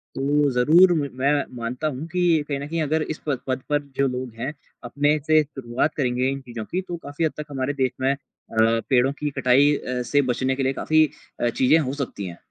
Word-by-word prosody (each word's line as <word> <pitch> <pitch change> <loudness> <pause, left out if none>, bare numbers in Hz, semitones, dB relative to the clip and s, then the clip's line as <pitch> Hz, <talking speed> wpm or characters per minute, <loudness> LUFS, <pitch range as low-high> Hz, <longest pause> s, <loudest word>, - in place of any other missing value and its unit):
तो 145 +2 +2
ज़रूर 155 +9 +6 0.2
मैं 130 +3 +1 0.2
मानता 125 +5 -3
हूँ 145 +1 -4
कि 170 -3 +2
कहीं 140 -2 -2
न 140 - -5
कहीं 165 +1 -2
अगर 155 +1 0
इस 155 0 -3
पद 135 -4 0
पद 130 0 -1
पर 145 0 +2 0.2
जो 140 - +3
लोग 125 -1 -4
हैं 130 +5 -3 0.3
अपने 145 +5 +1
से 155 0 +6
शुरुआत 135 0 -2
करेंगे 125 -2 0
इन 135 - -4
चीज़ों 120 -4 -7
की, 180 - -2
तो 175 -2 -6
काफ़ी 145 0 -3
हद 155 - 0
तक 150 - -5
हमारे 135 0 -2
देश 130 -3 0
में 135 +1 +3
अ, - - -7 0.7
पेड़ों 130 0 +4
की 150 - -1
कटाई 130 +3 +5
अ, 125 -2 -3
से 145 +4 +2
बचने 130 +2 0
के 135 - -1
लिए 135 +1 +1
काफ़ी 155 +3 +3 0.4
अ, 120 - +2
चीज़ें 130 +6 +3
हो 135 -4 -2
सकती 140 -8 -4
हैं। 85 -1 -7
140 Hz, 220 wpm, -23 LUFS, 125-150 Hz, 0.7 s, ज़रूर